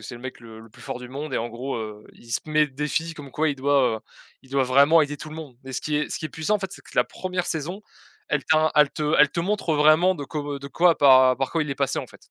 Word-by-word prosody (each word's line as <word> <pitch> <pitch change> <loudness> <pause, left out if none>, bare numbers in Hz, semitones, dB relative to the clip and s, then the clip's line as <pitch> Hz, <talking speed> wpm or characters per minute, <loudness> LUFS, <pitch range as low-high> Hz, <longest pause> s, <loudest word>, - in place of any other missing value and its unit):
c'est 110 - -8
le 120 - -11
mec 130 0 -7
le 110 -2 -12
le 115 - -14
plus - - -19
fort 125 - -6
du 125 - -9
monde 140 +1 -6
et - - +1
en 115 +1 -3
gros, 125 +4 -5
heu, 105 -2 -7
il 115 - -17
se - - +1
met 155 -1 +2
d - - -24
défis 160 +3 -2
comme 140 -3 -11
quoi 155 +1 +1
il 140 - -2
doit, 135 -4 +2
heu, - - -10 0.4
il 130 - -21
doit 135 0 +2
vraiment 140 +5 +5
aider 145 0 -3
tout 155 - -9
le 155 - -9
monde 150 -6 -9
et 130 - -8
ce - - -3
qui 150 -1 -2
est 150 - -1
ce - - -4
qui 155 - -3
est - - -13
puissant, 160 +8 -1
en 205 - 0
fait, 190 -1 -4
c'est - - -11
que - - -17
la - - +5
1re 180 -1 -4
saison, 175 +6 -4 0.5
elle 150 -4 -1
ta 155 0 +3
elle 150 -2 +6
te 150 0 -2
elle 150 - +7
te 170 - -2
montre 180 -3 -1
vraiment 155 +5 +5
de 145 - -7
cob 145 +1 -5
heu, 145 -1 -4
de 140 - -8
quoi 170 +3 +3
par 130 -2 +6
par 135 - -2
quoi 165 -2 0
il 150 - -6
est - - -2
passé, - - -1
en - - -4
fait. - - -19
145 Hz, 320 wpm, -24 LUFS, 130-155 Hz, 0.5 s, elle